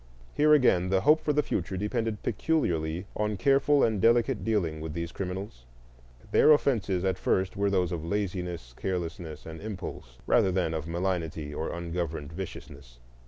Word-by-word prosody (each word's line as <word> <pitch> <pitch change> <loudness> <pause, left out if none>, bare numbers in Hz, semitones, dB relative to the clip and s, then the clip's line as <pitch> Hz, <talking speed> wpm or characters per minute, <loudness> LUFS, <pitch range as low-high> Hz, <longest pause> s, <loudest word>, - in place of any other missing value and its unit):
Here 150 +1 +4
again 110 -11 +4
the 95 0 +2
hope 150 +9 +5
for 150 - 0
the 150 0 +2
future 95 - -2
depended 105 +2 -2
peculiarly 85 - 0
on 105 -1 -1
careful 140 +5 +3
and 110 -4 +1
delicate 120 +2 +3
dealing 85 -9 0
with 80 -1 -5
these 85 0 -4
criminals. 95 - -6 0.7
Their - - +6
offences 100 -10 +1
at 95 -1 0
first 95 0 0
were 100 0 +1
those 90 -3 +1
of 85 -3 -3
laziness, 90 -7 -3
carelessness, 85 -3 -4
and 80 0 -8
impulse, 95 - -7
rather 95 - +3
than 90 -3 0
of 80 0 -3
malignity 85 -4 -2
or 80 - -3
ungoverned 85 -3 -4
viciousness. 70 -8 -9
90 Hz, 160 wpm, -28 LUFS, 80-105 Hz, 0.7 s, Their